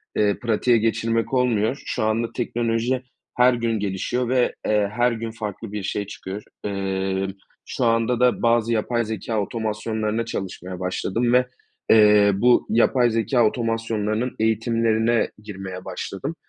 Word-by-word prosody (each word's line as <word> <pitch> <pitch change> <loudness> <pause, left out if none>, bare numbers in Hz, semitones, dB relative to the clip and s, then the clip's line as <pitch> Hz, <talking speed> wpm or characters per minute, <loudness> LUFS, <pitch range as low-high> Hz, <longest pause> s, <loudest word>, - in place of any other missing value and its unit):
eee, 105 -1 +1
pratiğe 120 +1 +2
geçirmek 115 +2 0
olmuyor. 125 0 +1
Şu - - -2
anda 110 +2 +1
teknoloji 120 +1 -1 0.4
her 125 +1 +6
gün 115 -2 -1
gelişiyor 105 +5 -2
ve, 125 -1 +2
eee, 105 -2 +2
her 120 0 +3
gün 115 0 -4
farklı 110 -1 -6
bir 105 -1 -4
şey 100 +1 -3
çıkıyor. 100 +1 -7 0.2
Emm, 95 -1 -2 0.3
şu 125 - -2
anda 115 +1 +2
da 125 -1 +3
bazı 115 0 +2
yapay 120 +2 0
zekâ 110 +1 -3
otomasyonlarına 110 +1 -2
çalışmaya 95 -4 -6
başladım 100 +6 -1
ve, 125 0 +5 0.4
eee, 105 -2 +6
bu 120 +5 +4
yapay 120 +2 +3
zekâ 115 +2 +2
otomasyonlarının 115 0 -1
eğitimlerine 115 +1 +1
girmeye 95 -3 -7
başladım. 100 - -5
115 Hz, 135 wpm, -23 LUFS, 105-120 Hz, 0.4 s, her